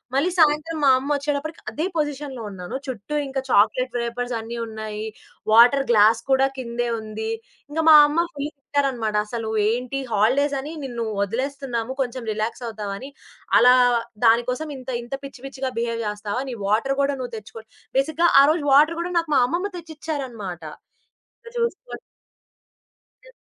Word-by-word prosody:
మళ్ళీ 285 +6 +2
సాయంత్రం 310 +1 +3
మా 275 - +6
అమ్మొచ్చేటప్పటికి 285 +2 -2
అదే 310 - -2
పొజిషన్‌లో 290 -4 -3
ఉన్నాను. 190 +4 -7
చుట్టూ 255 +3 -5
ఇంకా 265 0 -3
చాక్లేట్ 245 +5 +3
వేపర్సన్నీ 235 -1 -4
ఉన్నాయి. 220 -1 -6 0.5
వాటర్ 245 +5 +6
గ్లాస్ 220 +1 +5
కూడా 265 0 +4
కిందే 240 -1 -3
ఉంది. 220 0 -5 0.4
ఇంకా 320 +2 -1
మా 315 - +10
అమ్మ 330 +4 +1
ఫుల్ 290 +1 -4
తిట్టారనమాట. 265 -7 -1
"అసలు 225 -1 -4 0.2
ఏంటి 250 +4 -2
హాలిడేసని 275 +7 +1
నిన్ను 240 -3 -4 0.2
ఒదిలేస్తున్నాము. 255 +1 -3
కొంచుం 250 -1 -3
రిలాక్సవుతావని. 220 +1 -4 0.5
అలా 250 +1 +7 0.5
దానికోసం 250 +6 +2
ఇంత 260 0 -10
ఇంత 240 - -9
పిచ్చి, 275 -2 -10
పిచ్చిగా 270 -1 -4
బిహేవ్ 230 0 -2
జేస్తావా. 210 +3 -3
నీ 245 - -4
వాటర్ 230 +7 +1
గూడా 280 0 +1
నువ్వు 245 -2 -6
తెచ్చుకో" 220 +1 -11 0.3
బేసిక్‌గా 315 +5 +2
ఆరోజు 305 +3 +3
వాటర్ 305 +4 +5
గూడా 355 +1 -4
నాకు 330 -2 -4
మా - - +6
అమ్మమ్మ 365 +8 -2
తెచ్చిచ్చారనమాట. 270 - -6 0.8
ఇంక 465 - -10
జూసుకో 470 +1 -2 1.4
ఎ - - -17
255 Hz, 135 wpm, -23 LUFS, 225-290 Hz, 1.4 s, మా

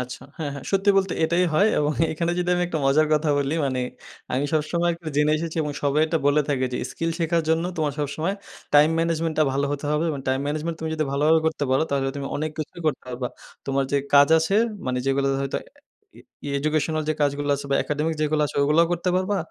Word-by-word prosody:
আচ্ছা। 125 0 -6 0.2
হ্যাঁ, 150 -3 -3
হ্যাঁ। 140 - -8
সত্যি 195 +1 +3
বলতে 195 -2 +2
এটাই 170 +3 +2
হয় 200 +6 +5
এবং 150 0 +1 0.2
এখানে 170 +2 -1
যদি 180 0 -1
আমি 180 - 0
একটা 170 -2 -2
মজার 150 +3 +4
কথা 155 +1 0
বলি 140 +2 0
মানে 130 -2 -1 0.5
আমি 130 +3 0
সবসময় 170 +3 +1
একটু 165 0 -16
জেনে 150 +1 +3
এসেছি 165 +1 -4
এবং 150 -1 -3
সবাই 145 +1 +2
এটা 165 +1 0
বলে 145 +1 +4
থাকে 135 -3 +1
যে, - - -1
"স্কিল 165 0 -2
শেখার 165 0 +1
জন্য 160 +1 +2
তোমার 150 -3 0
সবসময় 155 +6 -2 0.4
time 150 +2 +6
management 165 -1 0
টা 155 - +6
ভালো 140 +1 0
হতে 145 +1 -4
হবে। 150 +2 +1
এবং 140 - -4
time 130 +1 +1
management 155 +3 -2
তুমি 160 0 -3
যদি 155 - 0
ভালোভাবে 155 +3 +3
করতে 160 -2 0
পারো 130 +3 +3
তাহলে 135 -1 0
তুমি 140 -1 -4
অনেক 155 +1 -2
কিছুই 155 +2 -6
করতে 145 - 0
পারবা। 125 0 -3 0.4
তোমার 135 0 +1
যে - - +3 0.2
কাজ 140 0 +7
আছে 160 +5 0 0.3
মানে 125 0 0
যেগুলো 135 0 +1 0.2
হয়তো 135 - -2
এ - - -31 0.5
ই - - -13 0.3
ই - - -3
educational 155 +2 0
যে 155 - +1
কাজগুলো 145 0 0
আছে 140 - -7
বা - - +3
academic 150 +2 -1
যেগুলো 155 0 +1
আছে, - - -8
ওইগুলোও 150 +4 +4
করতে 175 +1 -1
পারবা। 190 +2 0
155 Hz, 225 wpm, -24 LUFS, 140-165 Hz, 0.5 s, কাজ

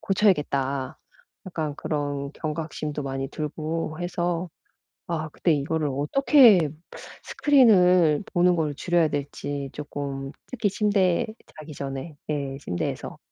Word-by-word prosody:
고쳐야겠다.' 140 -9 +1 0.5
약간 160 -5 -3
그런 145 -2 -3
경각심도 155 -1 -4
많이 135 0 -3
들고 155 +2 -4
해서 175 0 -2 0.6
아 160 -2 -3
근데 170 - 0
이거를 150 +1 -1
어떻게 190 - +5 0.5
스크린을 185 - +4
보는 180 0 +4
거를 155 -3 0
줄여야 170 +2 +1
될지 145 -1 -4
쪼끔 140 -2 -5 0.2
특히 220 -5 -1
침대 195 -3 +2 0.3
자기 155 0 -9
전에 135 +2 -6
예 140 -3 -2
침대에서 90 -11 -4
155 Hz, 250 characters per minute, -25 LUFS, 145-175 Hz, 0.6 s, 어떻게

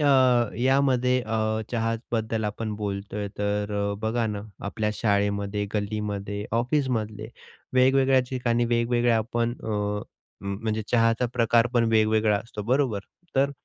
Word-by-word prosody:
अ, 130 -5 +4
यामध्ये 130 -1 +3
अ, 110 0 0
चहाबद्दल 115 -1 -1
आपण 105 +1 -3
बोलतोय, 100 0 -4
तर 105 0 -1 0.2
अ, - - -3
बघा 115 +1 0
ना 105 -2 -3 0.2
आपल्या 105 +1 -1
शाळेमध्ये, 100 -1 0
गल्लीमध्ये, 105 -1 -3 0.2
ऑफिसमधले 120 -5 -1 0.5
वेगवेगळ्या 130 +1 +5
ठिकाणी 120 -2 +1
वेगवेगळ्या 120 0 +2
आपण 115 +1 -1
अ, - - -5
हं, 105 -1 -4
म्हणजे 110 -1 -1
चहाचा 115 +1 +3
प्रकार 115 0 +4
पण 120 -1 +4
वेगवेगळा 110 -1 +3
असतो, 110 -1 -7
बरोबर? 125 -2 +1 0.4
तर 140 +1 +3
110 Hz, 125 wpm, -26 LUFS, 105-120 Hz, 0.5 s, वेगवेगळ्या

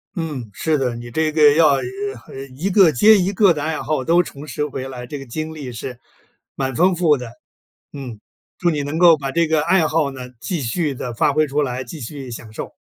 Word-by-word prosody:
嗯， 150 - -4
是 155 - 0
的， 130 -3 -1
你 120 0 -8
这 155 +5 0
个 150 -2 +6
要， 160 0 +6
呃 140 - +4 0.5
呃， - - -12
呃， 135 - -6
一 140 +9 -4
个 190 -4 +6
接 215 - +6
一 190 0 +1
个 200 -2 +4
的 150 -2 -4
爱 160 +1 -2
好 150 -3 -1
都 170 +5 +4
重 145 -4 -9
拾 150 -1 -3
回 135 -2 -5
来， 125 -2 -8
这 145 - -6
个 135 - -9
经 155 +6 -5
历 140 -5 -7
是 125 +1 -7 0.6
蛮 135 -2 -2
丰 180 +6 +4
富 170 -3 +3
的。 125 -3 -7 0.6
嗯， 130 -6 -7 0.4
祝 175 - +2
你 150 -3 -1
能 145 +3 -3
够 170 -3 +7
把 135 -1 -3
这 170 +3 +2
个 160 -1 +2
爱 165 +1 +3
好 155 -2 +1
呢， 125 -1 -8
继 170 -2 -3
续 145 +5 -1
地 125 -1 -5
发 115 - +2
挥 155 0 +3
出 145 +1 -1
来， 130 -2 -2
继 160 - -9
续 135 +1 -7
享 115 -1 -8
受。 - - -7
150 Hz, 250 characters per minute, -20 LUFS, 130-160 Hz, 0.6 s, 够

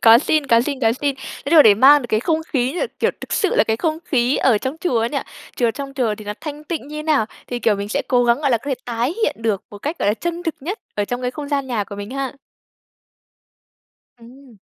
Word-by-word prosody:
Có 230 0 +8
xin, 300 +2 +1
có 230 -2 +5
xin, 270 +2 -3
có 225 -3 +3
xin. 280 +3 -1
Cái 270 +1 -8
điều 320 -2 +9
đấy 215 -5 +7
mang 275 +6 +7
được 240 - -5
cái 215 -1 +1
không 320 +5 0
khí 255 -2 0
như 355 - -4
là - - +1
kiểu - - +2
thực - - -7
sự 400 -5 +1
là 205 - +5
cái 220 0 0
không 315 +5 -1
khí 250 -1 +1
ở 235 -5 +3
trong 260 +7 -4
chùa 255 -10 +1
ấy 230 - +1
nhỉ. 280 - -1 0.4
Chùa 235 -2 +2
trong 275 +3 -7
chùa 240 -6 0
thì 215 0 -11
nó 205 - -3
thanh 300 -1 -7
tịnh 310 -3 -4
như 300 - -7
thế - - -4
nào 305 -8 +2 0.2
thì, 245 - -3
kiểu, 225 -3 +2
mình 200 +1 -4
sẽ - - -1
cố 245 -2 +3
gắng 235 +3 +3
gọi 285 -3 +1
là 235 - +3
có - - -19
thể - - +2
tái 240 +5 -1
hiện 295 - +1
được 215 -4 0
một 205 - -10
cách, 300 - -4
gọi - - +1
là, 205 - +3
chân 345 +8 -4
thực 325 -3 -2
nhất 370 - -4 0.2
ở 205 - 0
trong 245 +4 -4
cái 250 - -1
không 290 +2 -7
gian 280 -2 -1
nhà 235 -5 -1
của 200 - -9
mình 205 +2 -7
ha. 270 0 -3 1.9
Ừm. 245 0 -16
260 Hz, 280 wpm, -20 LUFS, 230-295 Hz, 1.9 s, điều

